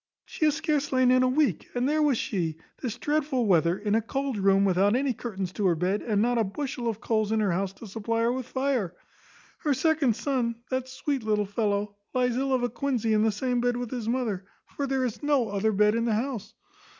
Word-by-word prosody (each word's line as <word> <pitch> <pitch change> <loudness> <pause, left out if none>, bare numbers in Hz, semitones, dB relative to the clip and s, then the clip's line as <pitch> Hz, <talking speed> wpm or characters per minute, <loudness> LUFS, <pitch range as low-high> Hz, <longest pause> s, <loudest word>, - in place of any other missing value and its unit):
she 310 - -1
hath 300 -1 +3
scarce 300 -2 0
lain 255 -1 +4
in 255 0 +5
a 255 - +4
week, 285 +3 +1
and 245 +1 +1
there 305 +2 +2
was 290 -5 +3
she, 165 -8 -2 0.2
this 245 -3 -3
dreadful 290 -3 0
weather, 170 -2 +3
in 205 0 -1
a 225 - +3
cold 270 +3 -2
room, 195 0 +3
without 195 +3 +3
any 265 0 +1
curtains 195 -6 -5
to 205 -1 +1
her 175 - +3
bed, 185 +5 0
and 210 -3 0
not 240 +2 +2
a - - +3
bushel 250 +4 -4
of 225 -2 -2
coals 220 -3 0
in 220 - +2
her 205 -3 +2
house 190 +2 -1
to 195 - -12
supply 225 +2 -2
her 235 +1 +2
with 255 -1 -4
fire; 260 -10 -1 0.6
her 290 -3 +1
second 290 -4 +2
son, 245 -3 -1 0.2
that 260 0 -1
sweet 270 +1 -2
little 210 -1 +1
fellow, 205 0 -1 0.2
lies 250 -1 +2
ill 270 +1 0
of 255 -2 +2
a 245 - +1
quinzy 240 -6 -1
in 215 - +3
the 220 0 +3
same 245 +3 -1
bed 245 0 +1
with 245 -2 -4
his 235 -3 -3
mother; 230 -7 -1 0.3
for 280 - -1
there 265 -1 0
is 240 -3 -4
no 285 -6 +2
other 205 +2 +1
bed 210 +1 +3
in 230 +1 0
the 225 -2 +1
house. 230 -2 -3
235 Hz, 235 wpm, -27 LUFS, 205-260 Hz, 0.6 s, in